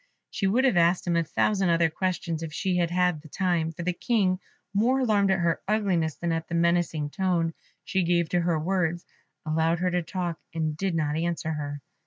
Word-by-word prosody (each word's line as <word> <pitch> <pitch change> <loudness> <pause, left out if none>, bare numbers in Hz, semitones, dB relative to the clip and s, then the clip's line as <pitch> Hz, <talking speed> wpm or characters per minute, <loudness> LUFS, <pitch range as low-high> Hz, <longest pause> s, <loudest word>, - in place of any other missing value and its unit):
She 200 -4 0
would 235 +7 +2
have 250 -9 +3
asked 175 +1 +3
him 175 -1 +1
a 170 - +3
thousand 190 +3 +1
other 165 -1 +3
questions 175 -2 -2
if 165 -2 -5
she 185 +3 -1
had 170 -1 +1
had 180 -3 +1
the 155 - -13
time, 170 -1 0
for 165 +2 -7
the 180 +1 0
King, 190 -2 +1 0.3
more 245 +6 +2
alarmed 205 -5 +3
at 190 - +3
her 170 -1 +1
ugliness 190 -7 +1
than 170 -1 -2
at 165 0 -2
the 170 - -3
menacing 170 -3 +1
tone 175 -3 0 0.3
she 190 - 0
gave 170 -1 +2
to 175 - +1
her 170 -1 +1
words, 175 0 -1 0.4
allowed 160 +2 +1
her 180 +1 0
to 180 0 +1
talk, 175 -1 -4 0.2
and 155 -2 -1
did 190 +1 -1
not 150 -2 0
answer 165 -1 -1
her. 145 -2 -4
170 Hz, 210 wpm, -26 LUFS, 165-185 Hz, 0.4 s, have